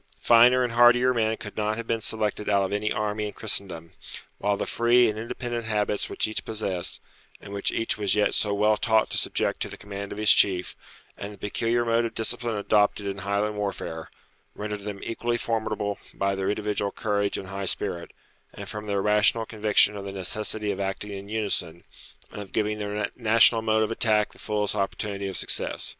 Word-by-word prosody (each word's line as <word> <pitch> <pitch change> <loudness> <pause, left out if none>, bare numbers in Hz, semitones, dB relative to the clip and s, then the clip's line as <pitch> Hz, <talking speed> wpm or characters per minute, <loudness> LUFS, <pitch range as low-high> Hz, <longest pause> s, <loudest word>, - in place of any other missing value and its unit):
Finer 120 +2 +6
and 120 -2 -2
hardier 120 +2 +6
men 110 -2 +1
could 105 - -9
not 110 0 -1
have 115 - -5
been 115 0 -1
selected 105 -1 -2
out 100 -1 +3
of 95 - -2
any 105 +1 -1
army 105 0 -1
in 105 - -7
Christendom; 90 -6 -2 0.5
while 100 0 +1
the - - -2
free 120 +1 +4
and 110 0 -2
independent 120 +1 -4
habits 105 -1 0
which - - -1
each 110 - -3
possessed, 100 -5 -3 0.4
and 100 - -10
which 100 - 0
each 115 -1 -1
was 100 -2 +2
yet 105 -1 +2
so 105 - +1
well 105 +1 +3
taught 110 -1 +2
to - - +2
subject - - -1
to - - -3
the - - -9
command 100 0 -7
of - - -6
his 110 0 +5
chief, 90 -2 +3 0.4
and 100 - -7
the 105 - -12
peculiar 115 +4 0
mode 115 0 +2
of 115 - -5
discipline 115 0 0
adopted 105 0 +2
in 100 0 -3
Highland 100 +2 -1
warfare, 80 -5 -4 0.5
rendered 105 0 -4
them 100 -2 -5
equally 120 +1 -1
formidable 110 -3 -2 0.2
by 100 0 0
their 95 0 -1
individual 105 -1 -1
courage 100 -2 -1
and 95 - -7
high 100 0 -4
spirit, 85 -1 -3 0.5
and - - -8
from 105 0 -6
their 100 -1 0
rational 105 +2 +3
conviction 105 -1 +2
of 100 - -6
the 100 - -5
necessity 105 +2 -2
of 100 - -5
acting 100 +1 -3
in 100 0 -7
unison, 100 -6 -2 0.5
and 105 - -7
of 100 - -10
giving 105 0 0
their 105 0 -2
national 115 0 +5
mode 110 0 +2
of 110 - -2
attack 110 -2 +1
the - - -18
fullest 105 -1 -1
opportunity 100 0 -2
of 95 - -3
success. - - -2
105 Hz, 200 wpm, -26 LUFS, 100-110 Hz, 0.5 s, Finer